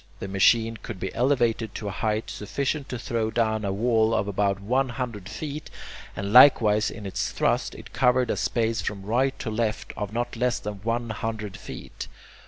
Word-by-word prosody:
The - - -6
machine 110 +4 +3
could 105 -5 -7
be 95 - -4
elevated 120 -4 +1
to 105 - -4
a - - -2
height 110 +2 -1
sufficient 140 +6 -3
to 125 - -3
throw 115 -1 -1
down 110 -1 0
a 100 - -1
wall 110 +2 +2
of 100 - 0
about 100 0 0
one 130 +6 +1
hundred 120 -6 -5
feet, 150 0 -6 0.5
and 100 +1 -3
likewise 110 -5 +7
in 105 - -9
its 95 - -2
thrust - - 0
it - - -12
covered 125 -1 +3
a - - 0
space 115 -1 0
from 100 -2 -4
right 130 +5 +1
to 115 - -4
left 110 0 -2
of 105 -2 -4
not 120 +2 -2
less 125 +1 +1
than 105 -2 -6
one 115 +1 -1
hundred 110 -2 -4
feet. - - -8
115 Hz, 190 wpm, -26 LUFS, 105-120 Hz, 0.5 s, likewise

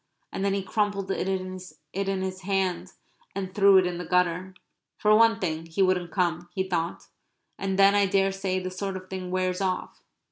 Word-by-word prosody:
And - - -3
then 200 0 +1
he 195 - -2
crumpled 200 -1 -1
it 190 - -1
in 185 -1 -3 0.6
his 185 0 -4
hand 185 -2 -1 0.4
and 190 -1 -4
threw 200 -1 +6
it 185 - +5
in 175 -1 -3
the - - -4
gutter. 180 +1 0 0.4
"For 210 0 +4
one 225 0 +5
thing 165 -3 -3
he 165 +4 +1
wouldn't 185 -2 +1
come," 175 -1 -1
he 190 0 -1
thought. 170 -2 -2 0.5
"And 195 -1 -1
then 195 0 +6
I 200 -1 +4
daresay 195 -1 +1
this 185 0 -5
sort 195 -2 -2
of 185 0 -12
thing 185 -1 -4
wears 185 +1 -1
off." 185 -1 -2
185 Hz, 185 wpm, -26 LUFS, 180-195 Hz, 0.6 s, threw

